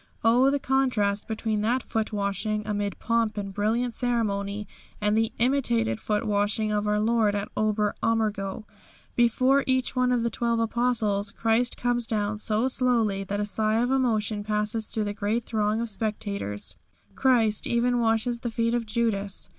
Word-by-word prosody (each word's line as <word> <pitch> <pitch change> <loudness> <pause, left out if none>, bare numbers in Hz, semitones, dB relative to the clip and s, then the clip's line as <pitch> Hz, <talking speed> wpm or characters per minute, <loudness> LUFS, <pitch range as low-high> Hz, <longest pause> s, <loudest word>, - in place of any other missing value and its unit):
Oh, 245 +4 +5
the 285 - +1
contrast 255 -7 0
between 220 -1 -2
that 240 +4 +1
foot 220 -1 -2
washing 210 +1 -2
amid 205 -2 -2
pomp 230 -2 0
and 200 -1 -4
brilliant 225 +4 0
ceremony 210 -4 -1 0.3
and 210 0 +1
the 225 0 +1
imitated 120 - +1
foot 210 +2 -1
washing 210 +1 0
of 210 0 0
our 210 0 +2
Lord 220 -1 +2
at 200 +1 -3
Ober 210 -1 +1
Ammergau. 215 -3 -1 0.5
Before 255 +3 +3
each 260 0 +1
one 250 0 +2
of 245 -2 +1
the 235 - 0
twelve 235 0 0
Apostles 225 -3 +1
Christ 230 +3 +1
comes 240 -1 0
down 210 -1 -1
so 215 +3 +1
slowly 235 -6 +1
that 200 +2 -3
a 205 - 0
sigh 215 +1 0
of 245 +2 +1
emotion 220 -5 0
passes 210 +1 -1
through 220 - -2
the 205 0 -3
great 220 +3 -1
throng 215 0 0
of 235 - -3
spectators. 200 - -3 0.4
Christ 230 -5 +2
even 240 +1 +1
washes 230 +1 +1
the 240 - -3
feet 230 +1 0
of 235 -2 -1
Judas. 215 -3 -1
220 Hz, 165 wpm, -26 LUFS, 210-235 Hz, 0.5 s, Oh